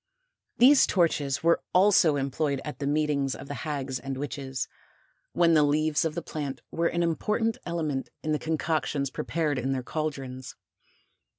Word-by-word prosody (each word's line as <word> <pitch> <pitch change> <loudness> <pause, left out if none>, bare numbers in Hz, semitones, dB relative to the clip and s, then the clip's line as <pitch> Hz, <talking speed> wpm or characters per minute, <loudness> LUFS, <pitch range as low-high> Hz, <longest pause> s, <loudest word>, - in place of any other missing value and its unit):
These 265 +3 +7
torches 145 -6 +1
were 170 0 +4
also 180 -5 +5
employed 140 +1 -1
at 150 - -6
the 140 - -2
meetings 145 -2 +1
of - - -10
the 145 - -5
hags 135 -4 -3
and 135 0 -5
witches, 135 -2 -4 0.7
when 170 -1 +4
the 155 - +6
leaves 150 +2 +2
of 160 -1 -2
the 170 - -3
plant 140 -5 -5
were 170 0 +1
an 170 +1 0
important 215 +7 0
element 155 -6 -2
in 155 - -1
the 150 - +1
concoctions 155 -3 -1
prepared 155 -5 -1
in 135 +2 -1
their 130 -1 -3
cauldrons. 135 -4 -5
150 Hz, 160 wpm, -27 LUFS, 135-165 Hz, 0.7 s, These